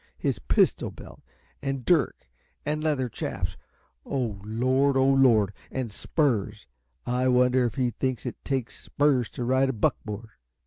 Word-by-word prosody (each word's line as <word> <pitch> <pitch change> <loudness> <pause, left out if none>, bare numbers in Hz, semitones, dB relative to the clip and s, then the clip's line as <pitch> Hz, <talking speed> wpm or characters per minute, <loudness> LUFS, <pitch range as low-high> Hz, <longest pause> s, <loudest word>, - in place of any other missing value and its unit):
'His - - -1
pistol - - +2
belt - - -12 0.4
and 135 -3 -3
dirk 155 - +1 0.4
and 150 +1 -1
leathern 135 -6 0
chaps' - - -4 0.5
oh, 115 -7 -3
Lord; 130 +5 +2
oh, 135 0 +4
Lord! 115 -7 +4 0.2
And 130 -4 -3
spurs! 110 -5 -1 0.4
I 125 +1 +1
wonder 125 0 +4
if 120 - -2
he 125 -3 +1
thinks 130 +1 -2
it 125 - -6
takes 130 -4 -3
spurs 140 -5 +2
to 125 - -5
ride 130 +2 +2
a - - 0
buckboard? 110 0 -2
130 Hz, 145 wpm, -26 LUFS, 115-135 Hz, 0.5 s, oh